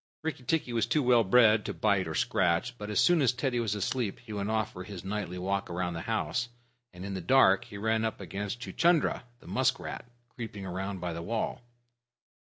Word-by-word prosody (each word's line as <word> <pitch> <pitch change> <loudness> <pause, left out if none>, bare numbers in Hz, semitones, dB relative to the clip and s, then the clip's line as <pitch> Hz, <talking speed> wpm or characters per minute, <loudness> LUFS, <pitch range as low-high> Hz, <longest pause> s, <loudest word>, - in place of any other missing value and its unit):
Rikki 160 -4 -3
tikki 130 -2 0
was 115 -1 +1
too 145 +4 +2
well 120 -2 +5
bred 110 +1 +5
to 100 - -4
bite 95 +1 +2
or - - -4
scratch, 90 +6 +1
but 105 0 -6
as 105 - +1
soon 175 -3 +5
as 130 -4 +4
Teddy 125 -1 -1
was 110 -3 0
asleep 105 +1 -2
he 110 - -7
went 100 0 -2
off 110 -1 0
for 90 - -7
his 95 -1 -8
nightly 100 -2 -3
walk 95 +2 -2
round 90 0 -2
the 80 - -4
house, 115 +3 -1 0.4
and 90 +1 -9
in 100 - -4
the 95 - -3
dark 120 +2 +5
he 115 -4 -9
ran 110 +2 +1
up 110 - -2
against 100 +4 -5
Chuchundra, 170 -4 +2 0.2
the - - -18
musk 130 +1 +1
rat, - - -7 0.2
creeping 110 -5 -7
around 95 +1 -4
by 90 -1 -3
the 85 - -5
wall. 110 +7 -2
105 Hz, 210 wpm, -29 LUFS, 95-120 Hz, 0.4 s, well